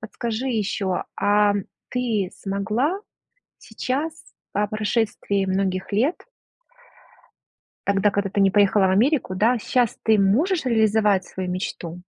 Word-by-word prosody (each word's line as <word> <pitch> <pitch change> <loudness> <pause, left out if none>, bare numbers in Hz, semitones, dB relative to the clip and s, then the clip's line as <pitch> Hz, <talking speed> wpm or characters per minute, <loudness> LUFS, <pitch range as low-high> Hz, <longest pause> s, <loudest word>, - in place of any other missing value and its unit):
подскажи 230 +3 -4
еще, 205 -5 -1
ам, 205 -1 +2 0.2
ты 225 -7 -1
смогла 215 - -1 0.6
сейчас, 265 +8 -3 0.4
по 205 +1 0
прошествии 210 -2 -1
многих 190 0 -1
лет 260 - +2 1.7
тогда, 200 +1 +3
когда 200 0 -1
ты 200 - 0
не 195 0 +5
поехала 200 0 +4
в - - +2
Америку, 225 0 +2
да, 230 +6 +2
щас 245 +1 0
ты 220 -1 +3
можешь 285 - +2
реализовать 220 -5 +2
свою 185 -1 -5
мечту? 180 -1 -5
210 Hz, 120 wpm, -23 LUFS, 195-235 Hz, 1.7 s, не